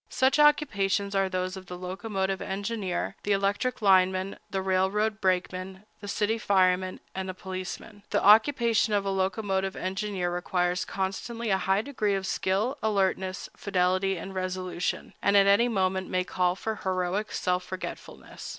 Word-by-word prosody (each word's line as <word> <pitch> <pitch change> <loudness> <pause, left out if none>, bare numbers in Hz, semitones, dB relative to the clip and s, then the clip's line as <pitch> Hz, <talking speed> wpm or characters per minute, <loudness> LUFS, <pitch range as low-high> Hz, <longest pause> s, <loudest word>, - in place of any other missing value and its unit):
Such 265 +3 +2
occupations 205 -10 +3
are 195 -1 +2
those 185 0 -2
of 190 -1 -10
the 180 - -7
locomotive 190 +1 -3
engineer, 200 -1 -3
the 205 - +1
electric 205 +4 0
lineman, 190 0 +3
the 190 -1 -2
railroad 195 +3 +1
brakeman, 185 +1 -1
the 205 - -9
city 215 +2 0
fireman, 185 -2 +2
and 190 0 -4
the 185 - -5
policeman. 185 +3 -7
The 205 - +2
occupation 225 0 +5
of 200 - +1
the 195 - -1
locomotive 195 0 -1
engineer 190 -1 -2
requires 180 +1 0
constantly 210 +4 -3
a 190 - +3
high 195 +2 +3
degree 220 -7 -1
of 195 0 -3
skill, 210 +10 0
alertness, 190 -3 0
fidelity, 185 0 +1
and 190 +3 -7
resolution, 185 -1 -3
and 200 0 +4
at 200 - +6
any 200 +4 +5
moment 190 -4 0
may 185 0 +1
call 180 -1 0
for 220 +2 -4
heroic 185 +2 -1
self 180 0 0
forgetfulness. 185 0 -8
190 Hz, 150 wpm, -27 LUFS, 185-205 Hz, -, at